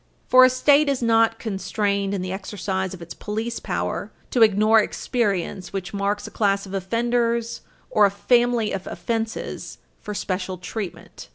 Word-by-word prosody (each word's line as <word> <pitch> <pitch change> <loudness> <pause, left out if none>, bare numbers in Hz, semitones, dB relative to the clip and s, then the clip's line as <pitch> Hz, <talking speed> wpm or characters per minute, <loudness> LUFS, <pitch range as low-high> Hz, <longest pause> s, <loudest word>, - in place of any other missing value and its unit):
For 255 0 +8
a 255 - +8
State 280 +3 +4
is 270 -3 -1
not 225 0 +3
constrained 200 -1 -1
in 185 - -3
the 185 - -4
exercise 190 -1 -3
of 175 - -10
its 170 - -9
police 220 +3 -4
power - - -3 0.2
to 245 - +1
ignore 215 +1 +6
experience 200 -6 -2
which 195 +1 -4
marks 205 +1 -1
a - - -8
class 200 -2 +1
of 195 - -10
offenders 235 +3 0 0.3
or 210 -1 +5
a - - -1
family 240 +2 +2
of 190 -1 -4
offenses 225 -1 -4 0.2
for 210 - -6
special 185 -1 -3
treatment. 180 -2 -7
210 Hz, 160 wpm, -23 LUFS, 195-230 Hz, 0.3 s, For